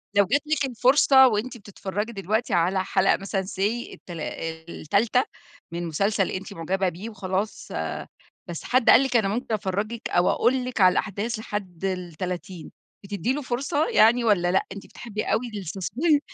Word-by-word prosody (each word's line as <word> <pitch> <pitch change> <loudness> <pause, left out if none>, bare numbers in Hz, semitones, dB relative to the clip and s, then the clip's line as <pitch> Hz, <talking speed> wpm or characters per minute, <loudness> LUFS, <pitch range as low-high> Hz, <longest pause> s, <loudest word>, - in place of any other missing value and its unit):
لو 200 0 +5
جات 280 +9 +2
لِك 305 -2 +1
الفرصة 265 +1 +5
وأنتِ 240 +2 -1
بتتفرجي 205 +1 -5
دلوقتي 215 +2 -1
على 185 +2 +2
حلقة 190 0 +2
مثلًا 195 0 -2
say 190 0 -8 0.3
التلا 170 -4 -8
آآ، 160 0 -5
ال3 220 - +1 0.5
من 170 0 -3
مسلسل 195 +4 0
أنتِ 195 +2 -5
معجبة 190 +2 -1
بيه 185 +6 -7
وخلاص، 195 0 -3
آآ، - - -4 0.4
بس 170 -2 -6
حد 255 -1 +2
قال 260 - +8
لِك 265 -2 -2
أنا 215 -4 +2
ممكن 230 +3 -2
أفرجِك 215 +2 -2
أو 175 0 +3
أقول 255 0 +2
لِك 250 -4 -2
على 185 -1 +7
الأحداث 215 +3 -2
لحد 195 -5 -5
ال30، 180 0 -5 0.3
بتدّي 205 +5 -2
له 295 - -3
فرصة 275 +4 -1
يعني 240 - +5
والَّا 185 -6 +3
لأ؟ 190 - +2
أنتِ 200 0 -8
بتحبي 215 -3 -6
أوي 245 +1 0
الsusp 205 - 0
205 Hz, 165 wpm, -25 LUFS, 185-240 Hz, 0.5 s, قال